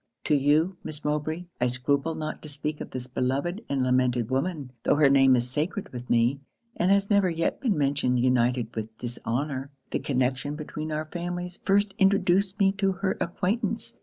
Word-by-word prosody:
'To - - +1
you, 150 +6 +2
Miss 150 -1 -8
Mowbray, 150 +3 -1 0.2
I 125 - +4
scruple 140 +5 0
not 155 -1 -4
to 155 - -9
speak 150 +1 -4
of - - -6
this 125 -1 -6
beloved 135 - -1
and 135 -2 +1
lamented 125 -2 +1
woman; 140 -1 -1
tho' - - +3
her 145 -2 +5
name 135 -1 +6
is 120 0 0
sacred 155 +10 -2
with 125 0 -7
me, 120 +4 +3 0.4
and 180 - +1
has 200 +1 +3
never 200 -2 +4
yet 165 0 -1
been 235 - +1
mentioned 140 -3 +1
united 125 -2 +1
with 110 0 -5
dishonour. 130 +3 -3 0.2
'The - - 0
connection 130 +2 -1
between 155 0 -5
our 155 +1 -2
families 175 +2 -5
first 200 +1 +3
introduced 195 0 +3
me 195 -2 +4
to 195 -1 +2
her 190 0 -1
acquaintance. 210 +6 -2
150 Hz, 180 wpm, -27 LUFS, 130-180 Hz, 0.4 s, name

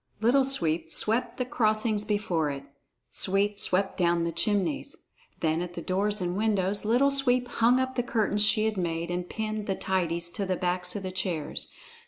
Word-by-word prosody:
Little 250 +5 +3
Sweep 165 -11 -1
swept 225 +7 +1
the 250 - -1
crossings 215 -3 0
before 205 -8 0
it; 140 -1 -5 0.5
Sweep 200 +2 +2
swept 190 +1 +1
down 170 -1 +2
the 170 - -1
chimneys. 175 -1 -1 0.4
Then 160 +1 +1
at 175 0 -6
the 170 - -5
doors 205 +3 -1
and 180 -1 -2
windows 205 -2 +1
Little 250 +6 +3
Sweep 255 -3 +2
hung 240 +2 +3
up 260 0 -2
the 245 - +1
curtains 215 -3 0
she 215 0 +3
had 220 -2 -1
made, 170 -1 -2
and 175 0 -3
pinned 215 -1 -4
the 195 - 0
tidies 170 -3 0
to 200 +1 -3
the 185 - 0
backs 180 0 -1
of 200 - -4
the 185 - -4
chairs. 175 -5 -2
200 Hz, 185 wpm, -27 LUFS, 175-220 Hz, 0.5 s, Little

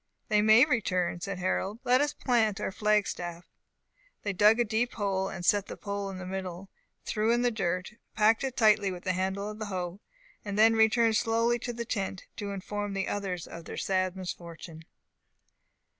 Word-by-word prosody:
"They 210 -1 +4
may 220 +4 +7
return," 185 - 0
said 195 0 -4
Harold; 190 +3 -1
"let 255 +1 +4
us 290 0 +1
plant 225 -8 +1
our - - -2
flag 210 +1 +2
staff." 175 -2 -5 0.8
They 205 - -1
dug 210 +5 +5
a 240 - +3
deep 230 +3 0
hole, 195 -3 -1
set 200 +2 +3
the - - -7
pole 200 -1 -4
in 190 - -6
the 185 - -7
middle, 185 0 -6 0.3
threw 220 +1 +1
in 240 +1 +2
the 245 - +3
dirt, 185 -2 -2 0.2
packed 220 +3 +4
it 265 -2 -3
tightly 215 -3 +4
with 180 -1 -8
the 185 - 0
handle 190 +2 -2
of 215 0 -7
the 215 - -3
hoe, 180 -1 -4 0.4
and 205 -1 -4
then 225 +1 +6
returned 220 0 +4
slowly 230 +1 +1
to 240 - -4
the 235 0 -5
tent, 195 -4 -3
to 205 - -4
inform 205 +1 -4
the 195 - -1
others 190 -4 -3
of 170 -1 -10
their - - -7
sad 185 -1 0
misfortune. 170 -3 -8
205 Hz, 190 wpm, -29 LUFS, 185-220 Hz, 0.8 s, may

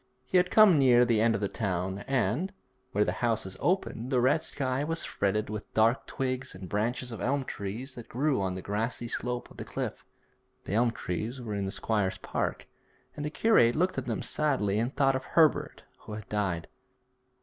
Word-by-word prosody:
He 185 - +2
had 180 0 +3
come 200 -8 +7
near 125 -2 +6
the 115 -3 +2
end 115 0 +3
of 100 - -3
the 100 - +1
town, 95 -2 -2
and, 135 - 0 0.4
where 105 - +3
the 90 - 0
houses 110 -5 0
opened, 170 -10 0
the 130 -2 +2
red 140 +6 +3
sky 135 -2 -1
was 165 +2 -2
fretted 105 +2 0
with 105 0 -6
dark 115 +3 +3
twigs 130 -2 -2
and 95 0 -8
branches 120 +5 -1
of 115 - -6
elm 135 +1 0
trees 115 +6 -5
which 120 - -10
grew 135 -1 +1
on 95 -1 -1
the 95 - -6
grassy 115 +4 -2
slope 125 +1 -3
of - - -15
the - - -5
cliff. - - -4 0.6
The - - -5
elm 120 +3 +4
trees 115 +3 -4
were 115 -4 -5
in 100 -1 -1
the - - -3
squire's 105 -4 0
park, - - -3 0.5
and 145 - -5
the 150 - -1
curate 150 - +4
looked 180 +3 +1
at - - -7
them - - -2
sadly 120 -10 +1
and 120 +3 0
thought 135 -2 +4
of 130 - -2
Herbert 160 +1 +2 0.2
who 105 - -9
had 105 -1 -7
died. 90 -6 -1
120 Hz, 200 wpm, -29 LUFS, 105-135 Hz, 0.6 s, come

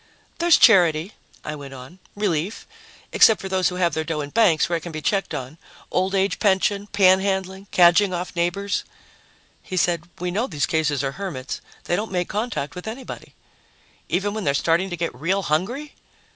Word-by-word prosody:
"There's 345 -1 +5
charity," 175 -5 +5 0.3
I 150 - -3
went 140 -2 -9
on, 130 +8 -12 0.2
"relief 195 -2 -2 0.5
except 220 - +6
for 195 - -6
those 185 -1 +2
who 180 - -6
have 175 -3 +1
their 160 - -1
dough 155 -1 -3
in 145 0 -6
banks, 205 -9 +3
where 170 - 0
it - - -8
can 170 - -7
be 155 - -5
checked 195 +5 -1
on 135 +5 -7 0.3
old 190 +2 0
age 195 +1 +1
pension, 200 0 +1
panhandling, 190 0 +2
cadging 180 +3 +5
off 180 +1 -4
neighbors." 175 +4 -1 0.8
He 185 - -6
said, 170 -1 0
"We 180 0 -3
know 220 +8 -1
these 145 -6 -1
cases 150 -3 0
are 135 - -1
hermits. 145 -9 -5 0.2
They 175 - 0
don't 215 +3 -3
make 180 -2 -1
contact 210 - -3
with 180 +3 -8
anybody." 245 +4 -8 0.7
"Even 200 +3 0
when 215 -1 -4
they're 140 -3 +1
starting 170 +6 +1
to 175 - -5
get 170 0 -2
real 180 +10 -1
hungry?" 230 - -2
180 Hz, 185 wpm, -23 LUFS, 160-200 Hz, 0.8 s, except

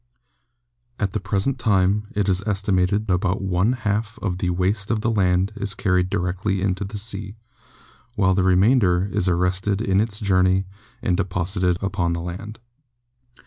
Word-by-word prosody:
At 100 -3 -2
the 110 - -1
present 100 +7 -1
time 100 -1 +2
it 105 -1 0
is 95 -1 +2
estimated 100 0 +1
about 95 +1 +1
one 95 +4 +1
half 110 -2 -2
of 90 -3 -3
the 90 - 0
waste 95 +3 0
of 110 -2 0
the 115 - +1
land 95 -2 +2
is 100 -3 -4
carried 90 -2 +1
directly 95 +2 -1
into 95 +1 -1
the 100 +2 -6
sea, 100 -1 -5 0.8
while 95 -3 +3
the 95 - +2
remainder 95 0 +3
is 90 - +1
arrested 90 +3 +1
in 100 -3 +2
its 110 -1 -2
journey 95 -2 +2 0.4
and 90 - +1
de 100 - +2
posited 90 0 -1
upon 95 -3 0
the 85 - -3
land. 95 +5 -7
95 Hz, 160 wpm, -22 LUFS, 90-105 Hz, 0.8 s, while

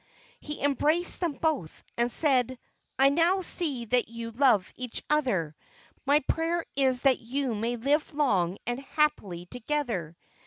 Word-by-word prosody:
He 300 -1 -7
embraced 300 +5 +2
them 345 -4 -1
both, 280 - -2
and 240 +1 +1
said: 260 -4 +3 0.4
"I 270 +1 +6
now 340 +6 +2
see 300 -9 -2
that 245 +1 +1
you 230 0 -6
love 230 -6 +2
each 250 -2 -6
other; 195 - +1 0.5
my 290 +2 +4
prayer 330 +4 -1
is 260 -2 +2
that 270 -2 +4
you 255 +1 -2
may 230 +3 -2
live 285 +7 0
long 200 - +1
and 240 +2 -2
happily 265 - -1
together." 230 - -3
260 Hz, 145 wpm, -28 LUFS, 230-300 Hz, 0.5 s, I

